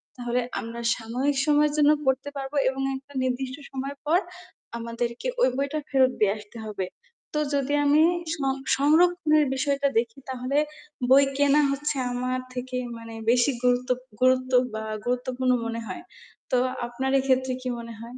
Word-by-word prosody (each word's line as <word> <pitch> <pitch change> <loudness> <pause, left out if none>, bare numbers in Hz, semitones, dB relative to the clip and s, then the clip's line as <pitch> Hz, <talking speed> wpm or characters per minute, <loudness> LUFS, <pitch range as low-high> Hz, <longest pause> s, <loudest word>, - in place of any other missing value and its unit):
তাহলে 245 0 -1 0.2
আমরা 230 +1 -6 0.2
সাময়িক 250 +5 -1
সময়ের 300 0 +3
জন্য 295 0 +6
পড়তে 265 +2 +1
পারবো 270 +1 -5
এবং 265 +1 -4
একটা 270 +2 -11
নির্দিষ্ট 255 0 -2 0.2
সময় 275 +1 -4
পর 325 +4 +4 0.6
আমাদেরকে 235 - -3
ওই - - +6
বইটা 280 +3 -1
ফেরত 260 -2 +4
দিয়ে 200 -2 +3
আসতে 210 +2 -12
হবে। 195 -3 -3 0.5
তো - - +2
যদি 280 0 0
আমি 295 +2 +5 0.3
স - - -2 0.4
-সংরক্ষণের 310 +1 +4
বিষয়টা 280 +1 +1
দেখি 230 +2 -4
তাহলে 260 +2 -2 0.5
বই 275 +2 +7
কেনা 285 +1 +4
হচ্ছে 290 +1 -2
আমার 255 +1 -1
থেকে 255 0 -4 0.2
মানে 230 0 -10 0.2
বেশি 245 +3 +3
গুরুত্ব 250 +1 +2 0.3
গুরুত্ব 255 0 +3 0.2
বা 220 0 -4 0.2
গুরুত্বপূর্ণ 250 +1 0
মনে 230 0 -3
হয়. 345 - -6 0.5
তো 255 - +4 0.3
আপনার 260 +3 -2
এই - - -2
ক্ষেত্রে 260 0 +2
কি 255 - -3
মনে 230 0 -8
হয়? 235 +2 -9
260 Hz, 155 wpm, -26 LUFS, 245-280 Hz, 0.6 s, বই